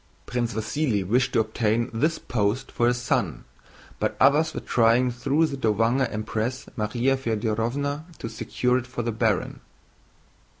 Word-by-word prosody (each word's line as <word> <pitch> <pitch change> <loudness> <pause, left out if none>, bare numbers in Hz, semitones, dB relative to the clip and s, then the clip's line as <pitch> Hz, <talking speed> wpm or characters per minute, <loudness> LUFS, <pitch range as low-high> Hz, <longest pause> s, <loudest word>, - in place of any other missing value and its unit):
Prince 120 -2 -2
Vasíli 110 -2 0
wished 125 +6 +2
to - - +3
obtain 110 +2 0
this 155 +9 +1
post 110 +3 -1
for 120 - +1
his 120 0 +2
son, 120 - -1 0.6
but - - -1
others 145 +4 +4
were - - -4
trying 120 +2 +3
through 135 +6 +1
the 145 -3 -3
Dowager 115 +3 +2
Empress 110 +4 -3
Márya 120 +4 +1
Fëdorovna 130 +6 -2
to - - -5
secure 125 +2 0
it 130 - -9
for 125 -1 -4
the 115 - -1
baron. 110 -3 0
120 Hz, 145 wpm, -25 LUFS, 110-130 Hz, 0.6 s, others